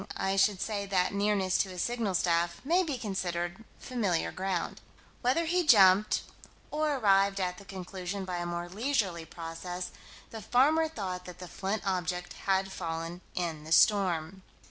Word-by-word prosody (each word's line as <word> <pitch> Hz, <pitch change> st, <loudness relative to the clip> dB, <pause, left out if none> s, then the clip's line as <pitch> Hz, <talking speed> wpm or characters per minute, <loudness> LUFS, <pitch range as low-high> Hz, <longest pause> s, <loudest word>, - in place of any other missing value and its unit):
I 195 Hz, 0 st, 0 dB
should 195 Hz, 0 st, +3 dB
say 205 Hz, -2 st, -3 dB
that 185 Hz, -1 st, +1 dB
nearness 200 Hz, -2 st, +1 dB
to 195 Hz, -, +1 dB
a 180 Hz, -, -9 dB
signal 225 Hz, -1 st, -1 dB
staff 170 Hz, 0 st, +1 dB
may 345 Hz, +5 st, +4 dB
be 305 Hz, -7 st, -2 dB
considered 185 Hz, -3 st, -3 dB
familiar 205 Hz, -9 st, -1 dB
ground. 185 Hz, -2 st, -3 dB, 0.4 s
Whether 265 Hz, +7 st, +2 dB
he 355 Hz, +2 st, +2 dB
jumped, 205 Hz, -, +6 dB, 0.5 s
or 300 Hz, -1 st, +1 dB
arrived 200 Hz, -4 st, +3 dB
at 180 Hz, -1 st, -2 dB
the 200 Hz, -, -13 dB
conclusion 190 Hz, 0 st, -5 dB
by 180 Hz, -1 st, -3 dB
a 175 Hz, 0 st, -3 dB
more 175 Hz, 0 st, -3 dB
leisurely 195 Hz, -5 st, -1 dB
process, 175 Hz, +2 st, -6 dB, 0.4 s
the 225 Hz, -, -7 dB
farmer 295 Hz, -, +3 dB
thought 185 Hz, -11 st, -5 dB
that 180 Hz, -, -9 dB
the 180 Hz, -, -8 dB
flint 195 Hz, +4 st, -3 dB
object 180 Hz, -2 st, -2 dB
had 190 Hz, 0 st, +2 dB
fallen 165 Hz, -1 st, -4 dB
in 165 Hz, -4 st, -2 dB
the 155 Hz, -, -10 dB
storm. 185 Hz, -2 st, +3 dB
190 Hz, 160 wpm, -30 LUFS, 175-210 Hz, 0.5 s, jumped